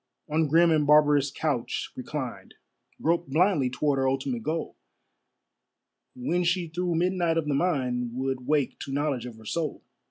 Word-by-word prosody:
On 155 +1 +1
grim 165 +3 +5
and 150 -2 +2
barbarous 145 -1 +5
couch 135 -4 -2
reclined, - - -6 0.5
Groped 170 -1 +1
blindly 155 -3 +3
toward 140 +2 0
her 135 0 +2
ultimate 130 -3 -2
goal, 160 +7 -3 1.4
When 170 +8 0
she 175 0 +1
through 175 +1 -1
midnight 175 -1 +1
of 165 - 0
the 150 - 0
mind 130 -6 0
Would 130 -1 -3
wake 145 -3 +1
to 135 - -6
knowledge 140 -3 -1
of 120 - -9
her 110 0 -15
soul. 155 +6 -3
150 Hz, 155 wpm, -27 LUFS, 135-165 Hz, 1.4 s, grim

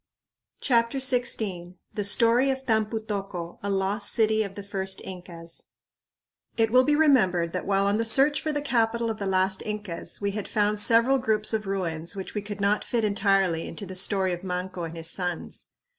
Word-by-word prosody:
CHAPTER 235 0 +2
XVI 220 -9 +1 0.2
The 210 - -2
Story 230 +5 +3
of 265 0 -2
Tampu 220 -1 0
tocco, 195 -5 -5
a 200 - -3
Lost 195 +2 +1
City 220 -1 +2
of 200 -2 -4
the 200 - -7
First 190 -1 -3
Incas 170 -2 -10 0.9
It 225 -1 +2
will 255 +1 +6
be 295 +2 +2
remembered 190 - +3
that 185 - -4
while 195 0 +2
on 200 +1 +2
the - - +1
search 275 +6 +3
for 310 - -2
the 290 -1 -2
capital 235 -3 +1
of 220 - -6
the 200 - -3
last 190 0 +1
Incas 210 -5 -2
we 200 0 -1
had 210 0 -5
found 210 -1 +1
several 235 +5 +3
groups 220 -3 0
of 215 -2 -2
ruins 170 -3 -2
which 190 -1 -6
we 210 - -2
could 205 0 -7
not 200 +1 +1
fit 235 -2 -1
entirely 195 -5 +1
into 185 +5 -5
the 185 - -8
story 190 0 +1
of 175 +1 -6
Manco 180 -1 -4
and 165 0 -8
his 165 +1 -1
sons. 180 -2 -3
205 Hz, 190 wpm, -26 LUFS, 185-230 Hz, 0.9 s, will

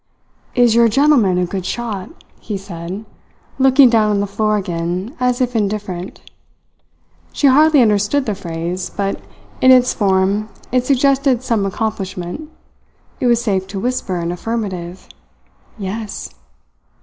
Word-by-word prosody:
"Is 245 -3 +4
your 235 0 +5
gentleman 235 -6 +3
a 180 - +1
good 185 +1 -4
shot?" 210 -1 -4 0.3
he 210 -3 -5
said, 190 +2 -7 0.5
looking 265 0 +6
down 225 -3 +3
on 205 -1 +1
the 200 - 0
floor 215 +1 0
again, 180 - -3
as 250 0 +1
if 250 -1 0
indifferent. 200 -4 -3 1.1
She - - -1
hardly 290 +1 +6
understood 215 +6 +1
the 215 - -1
phrase; 175 0 -4
but 195 -1 -3 0.4
in 260 - +5
its 255 -1 +6
form 200 +1 +1 0.2
it 250 0 +1
suggested 275 -2 +2
some 220 -6 0
accomplishment. 195 - -4 0.7
It 250 - +1
was 235 -1 +3
safe 190 -4 -1
to 195 0 -5
whisper 245 -5 -2
an 170 0 -2
affirmative. 185 -3 -5 0.7
"Yes." 210 +1 -5
210 Hz, 135 wpm, -18 LUFS, 190-245 Hz, 1.1 s, looking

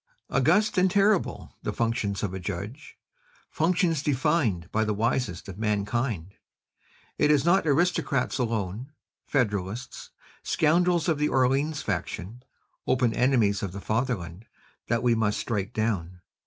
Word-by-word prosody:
"August 210 -2 +3
and 185 +1 +4
terrible 190 - +1
the - - -2
functions 115 -4 -1
of 95 -3 -2
a 95 - -4
judge, 100 - -6 0.5
functions 165 -2 +1
defined 135 - +1
by 110 - +1
the 105 -1 -1
wisest 115 -4 -1
of 95 0 -8
mankind! 105 -3 -1 0.9
It 150 - +4
is 150 -1 +3
not 175 -1 +3
aristocrats 145 -4 +1
alone, 115 +2 -2 0.3
federalists, 105 -2 -2 0.3
scoundrels 170 +2 +2
of 160 -4 +1
the 150 - +2
Orleans 135 +4 +1
faction, 110 +8 -4 0.5
open 125 -3 +2
enemies 115 -6 +2
of 95 -3 -4
the 100 - -6
fatherland, 110 -4 -3 0.4
that 115 0 0
we 120 -1 +4
must 110 -2 0
strike 105 -4 -2
down. 95 -6 -2
120 Hz, 130 wpm, -26 LUFS, 100-150 Hz, 0.9 s, and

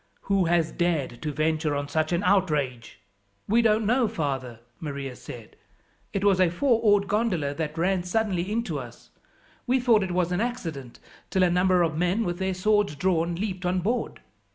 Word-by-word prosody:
"Who 195 -2 +1
has 165 -1 +2
dared 155 -9 -1
to 150 - -2
venture 155 0 0
on 145 0 -2
such 155 +2 -1
an 175 +2 0
outrage?" 150 - 0 0.5
"We 230 +4 +4
don't 220 -1 +2
know, 245 +2 +3
father," 130 - -3 0.2
Maria 140 -4 -5
said. 120 -2 -11 0.6
"It 195 - -2
was 200 -2 +4
a 185 -2 +4
four 230 +6 +1
oared 205 -3 +3
gondola 195 -10 0
that 155 +1 -4
ran 185 +2 +1
suddenly 185 0 -1
into 230 +2 -2
us. - - -11 0.6
We 255 +2 +3
thought 235 -4 +4
it 190 - -2
was 180 -1 0
an 180 +3 0
accident 165 - -4 0.3
till 190 - +2
a 180 - +3
number 180 0 +3
of 160 -2 -1
men, 180 +7 +1
with 175 0 -3
their 190 -1 -1
swords 205 -2 +1
drawn, 170 0 0
leaped 190 0 -4
on 180 +1 0
board. 230 +7 -2
180 Hz, 180 wpm, -26 LUFS, 155-205 Hz, 0.6 s, We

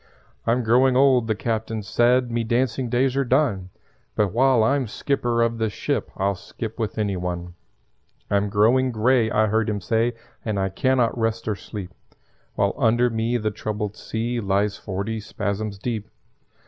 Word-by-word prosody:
"I'm 120 +2 +2
growing 125 +3 +4
old," 130 -4 +4
the 110 - +1
Captain 110 0 -2
said; 120 +3 +2
"Me 115 0 0
dancing 120 +1 0
days 130 +2 +1
are 140 - +2
done; 120 -8 +1 0.5
But 105 -3 +1
while 130 -1 +4
I'm 135 +2 +1
skipper 120 0 0
of 115 0 -1
this 110 -2 -1
ship - - -2
I'll 100 +1 +1
skip 110 +4 -7
with 110 -1 -2
any 105 -3 0
one. 90 -1 -4 0.7
"I'm 100 0 +1
growing 120 +6 +3
grey," 115 +1 +2
I 110 0 +3
heard 110 +1 +1
him 105 -1 -1
say, 115 +4 0 0.3
"And 105 -3 -1
I 95 0 0
can 130 +7 +1
not 120 -2 +2
rest 115 -1 -1
or 105 - 0
sleep 95 0 -8 0.6
While - - +1
under 120 +2 +3
me 115 +2 0
the 110 -2 -1
troubled 105 0 -4
sea 120 +2 -3
Lies 100 0 0
forty 105 +3 -4
spasms 105 0 -3
deep. 110 0 -4
110 Hz, 170 wpm, -23 LUFS, 105-120 Hz, 0.7 s, growing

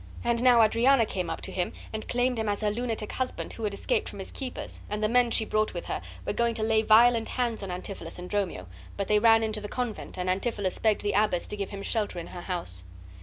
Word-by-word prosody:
And 235 0 +1
now 245 -2 +7
Adriana 230 +3 +4
came 185 -3 -3
up - - -4
to - - -3
him 180 -2 -2 0.2
and 220 0 -4
claimed 245 0 +1
him 220 -1 0
as 205 +1 -1
her 210 -1 +1
lunatic 225 -1 -2
husband 255 -1 -3
who 225 - -4
had 205 - -1
escaped - - 0
from - - -10
his - - -5
keepers, 260 -2 -6
and 210 +1 -2
the - - +4
men 245 +1 +4
she 225 -1 +1
brought 215 0 0
with - - -4
her - - -3 0.2
were - - -1
going 235 -1 +1
to 220 - -1
lay 220 0 +3
violent 225 +1 +5
hands 240 -4 -1
on 195 - -5
Antipholus 180 -1 -6
and 180 0 -7
Dromio; 185 - -2 0.3
but 200 -1 -2
they 210 0 +4
ran 225 0 +6
into 215 -1 -1
the 210 - -6
convent, 245 -3 -4
and 180 0 -2
Antipholus 195 0 -1
begged 220 -2 +2
the 205 0 0
abbess 205 -4 +2
to - - -6
give 200 -1 -4
him 200 -1 -6
shelter 210 -5 -1
in 170 - -4
her 175 - -8
house. 170 - -3
215 Hz, 250 wpm, -28 LUFS, 200-235 Hz, 0.3 s, now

